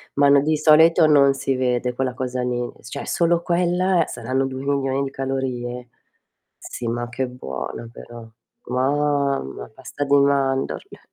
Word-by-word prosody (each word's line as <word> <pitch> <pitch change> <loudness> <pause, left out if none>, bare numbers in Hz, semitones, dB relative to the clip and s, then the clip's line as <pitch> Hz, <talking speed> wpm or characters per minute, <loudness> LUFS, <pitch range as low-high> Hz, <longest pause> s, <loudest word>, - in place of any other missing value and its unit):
Ma 140 0 +4
no, 140 -1 +6
di 155 +1 +1
solito 160 +2 +5
non 140 -2 +5
si 135 -1 -1
vede 125 -1 0
quella 130 0 -2
cosa 125 0 -3
lì, 125 -1 -1 0.2
s - - -14
cioè 140 - -6
solo 170 0 +1
quella 180 0 +1
saranno 130 +3 -2
2.000.000 135 0 -1
di 135 - -4
calorie. 125 -2 -4 0.7
Sì 120 - -7
ma 120 +1 -2
che 130 +1 -3
buona 115 - -6
però. 120 -1 -11 0.4
Mamma, 140 - -1
pasta 130 +3 -6
di 140 +1 +3
mandorle. 135 -1 0
135 Hz, 145 wpm, -22 LUFS, 125-145 Hz, 0.7 s, no